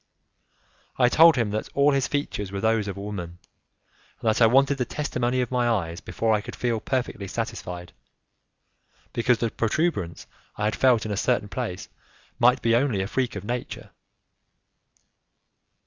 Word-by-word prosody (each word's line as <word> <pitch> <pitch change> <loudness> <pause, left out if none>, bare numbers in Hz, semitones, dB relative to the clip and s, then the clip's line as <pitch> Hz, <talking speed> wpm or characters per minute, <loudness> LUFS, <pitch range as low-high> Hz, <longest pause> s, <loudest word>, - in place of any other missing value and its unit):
I 125 -2 +4
told 165 +4 +7
him 115 -5 0
that 110 +1 -3
all 140 +1 +4
his 135 -2 +1
features 105 -9 -3
were 100 - -4
those 110 0 +1
of 100 -1 -5
a - - -6
woman, 90 -4 -6 0.8
and - - -4
that 110 - +1
I 115 - +8
wanted 135 +3 +3
the - - +2
testimony 125 -4 -1
of 125 - -3
my 125 -1 +1
eyes 85 -7 -1
before 115 -1 0
I 105 - +1
could - - -8
feel 120 -2 -1
perfectly 125 -5 -3
satisfied, 90 -5 -5 1.2
because 120 +1 +2
the 115 -1 -1
protuberance 110 - -1 0.3
I 105 - -1
had 105 - 0
felt 125 -4 +3
in 110 - -3
a 100 - -2
certain 120 -2 0
place 90 -1 -4 0.5
might 125 +2 +4
be 115 0 +3
only 120 -6 +1
a - - -4
freak 125 0 -1
of 100 - -5
nature. 120 +3 -5
115 Hz, 165 wpm, -25 LUFS, 100-125 Hz, 1.2 s, I